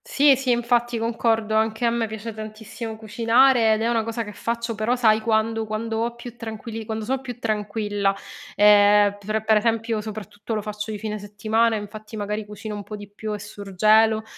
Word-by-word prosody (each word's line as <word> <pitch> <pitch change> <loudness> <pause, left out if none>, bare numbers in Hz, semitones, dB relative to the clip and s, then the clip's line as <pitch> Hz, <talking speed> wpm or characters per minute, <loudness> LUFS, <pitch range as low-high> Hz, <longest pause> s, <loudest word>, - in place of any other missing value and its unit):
Sì, 285 -1 +5
sì, 265 0 -3
infatti, 240 0 +1
concordo. 225 -1 0
Anche 220 +2 +1
a 235 - +3
me 230 -1 0
piace 220 +1 -6
tantissimo 220 +1 -7
cucinare 230 +2 +4
ed 215 - -1
è - - +1
una 230 -2 +1
cosa 230 +1 -3
che 210 -1 -9
faccio, 235 +2 -3
però 220 +3 0
sai 220 -3 +3
quando 225 0 +1
quando 220 +1 -3
ho 235 +1 -1
più 240 0 -10
tranquilli 225 0 -6
quando 220 0 -4
so' 265 +3 -1
più 250 -3 -7
tranquilla. 210 -3 -1 0.4
Ehm, 205 0 +6
per 215 +2 -2
per 220 -1 +5
esempio 225 0 0
soprattutto 210 0 -6
lo 215 - -2
faccio 210 +1 -5
di 215 - -3
fine 215 0 -4
settimana, 215 +3 0
infatti 215 +1 -7
magari 210 +1 -3
cucino 210 +1 -7
un 205 - -5
po' 210 +1 -8
di 205 0 -9
più 215 +2 -6
e 210 - -2
surgelo, 215 +2 +2
220 Hz, 190 wpm, -23 LUFS, 210-230 Hz, 0.4 s, Ehm